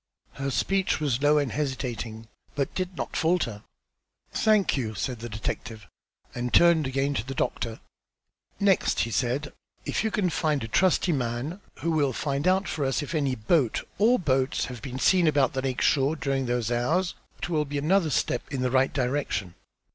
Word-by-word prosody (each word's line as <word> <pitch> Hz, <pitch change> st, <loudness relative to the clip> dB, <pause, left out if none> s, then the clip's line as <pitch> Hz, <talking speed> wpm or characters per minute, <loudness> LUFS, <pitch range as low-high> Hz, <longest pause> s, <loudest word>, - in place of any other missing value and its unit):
Her 135 Hz, 0 st, -3 dB
speech 190 Hz, +8 st, +1 dB
was 140 Hz, -4 st, 0 dB
low 145 Hz, +1 st, +4 dB
and 145 Hz, -5 st, 0 dB
hesitating, 120 Hz, -6 st, -3 dB, 0.3 s
but 140 Hz, -2 st, 0 dB
it -, -, -28 dB
did 185 Hz, -2 st, -3 dB
not -, -, -4 dB
falter. 160 Hz, -, 0 dB, 0.7 s
"Thank 215 Hz, -3 st, +3 dB
you," 110 Hz, -5 st, -2 dB
said 120 Hz, +4 st, -3 dB
the 120 Hz, +1 st, -6 dB
detective, 110 Hz, 0 st, -5 dB, 0.5 s
and 120 Hz, 0 st, -3 dB
turned 170 Hz, -4 st, +5 dB
again 135 Hz, +2 st, 0 dB
to 110 Hz, -, -1 dB
the 135 Hz, +2 st, -6 dB
doctor. 115 Hz, -3 st, -2 dB, 0.8 s
"Next," 200 Hz, -2 st, +3 dB, 0.2 s
said 125 Hz, +8 st, 0 dB, 0.4 s
he, -, -, -3 dB
"if -, -, 0 dB
you 220 Hz, -, +1 dB
can 195 Hz, -4 st, 0 dB
find 155 Hz, -6 st, 0 dB
a -, -, -4 dB
trusty 180 Hz, +7 st, +2 dB
man, 135 Hz, +6 st, -2 dB, 0.2 s
who 165 Hz, -, 0 dB
will 145 Hz, -4 st, +2 dB
find 140 Hz, +2 st, -1 dB
out 190 Hz, +2 st, +3 dB
for 150 Hz, -, -2 dB
us 135 Hz, +3 st, 0 dB
if 145 Hz, -, -6 dB
any 140 Hz, -5 st, +1 dB
boat 125 Hz, +2 st, +1 dB
or 235 Hz, +4 st, +5 dB
boats 135 Hz, -, +1 dB
have 125 Hz, -3 st, -8 dB
been 130 Hz, +1 st, -6 dB
seen 180 Hz, +4 st, +4 dB
about 140 Hz, -4 st, +3 dB
the 130 Hz, -, -1 dB
lake 130 Hz, -1 st, -2 dB
shore 140 Hz, +2 st, +3 dB
during 135 Hz, -3 st, -1 dB
those 120 Hz, -1 st, -1 dB
hours, 160 Hz, +10 st, +1 dB, 0.2 s
it -, -, -5 dB
will 155 Hz, -3 st, +1 dB
be 145 Hz, 0 st, -4 dB
another 165 Hz, +4 st, +2 dB
step -, -, 0 dB
in 135 Hz, -, -2 dB
the 125 Hz, -, 0 dB
right 130 Hz, 0 st, +3 dB
direction. 125 Hz, -9 st, -1 dB
140 Hz, 185 wpm, -26 LUFS, 125-160 Hz, 0.8 s, turned